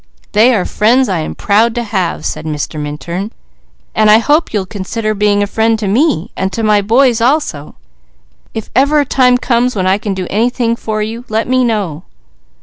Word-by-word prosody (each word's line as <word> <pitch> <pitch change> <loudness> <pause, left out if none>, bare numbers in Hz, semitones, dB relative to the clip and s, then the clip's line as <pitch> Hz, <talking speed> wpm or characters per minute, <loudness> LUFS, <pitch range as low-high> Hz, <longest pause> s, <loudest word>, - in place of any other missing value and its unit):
"They 230 +4 +4
are 185 - 0
friends 245 +5 +2
I'm 170 -5 -3
proud 220 +3 +2
to 240 - -1
have," 185 -7 -2
said - - -3
Mr. 155 0 -4
Minturn. 150 +8 -5 0.6
"And 215 -1 +3
I 215 - +7
hope 295 +8 +1
you'll 205 -3 -1
consider 215 +2 -3
being 205 0 +1
a - - +1
friend 225 +2 +1
to 215 -2 -3
me, 220 - +1
and 190 0 -2
to 225 - -3
my 210 -1 +3
boys 235 +3 +2
also. 240 - -1 0.8
If 220 - -6
ever 285 +4 +3
a - - -1
times 250 -1 +2
comes 245 0 +1
when 185 -2 -1
I 190 +2 +2
can 200 -2 -3
do 185 -1 -4
anything 235 +2 0
for 215 -2 -3
you, 225 +3 -6
let 220 +1 -1
me 255 0 +2
know." 200 -10 -2
215 Hz, 190 wpm, -14 LUFS, 195-240 Hz, 0.8 s, I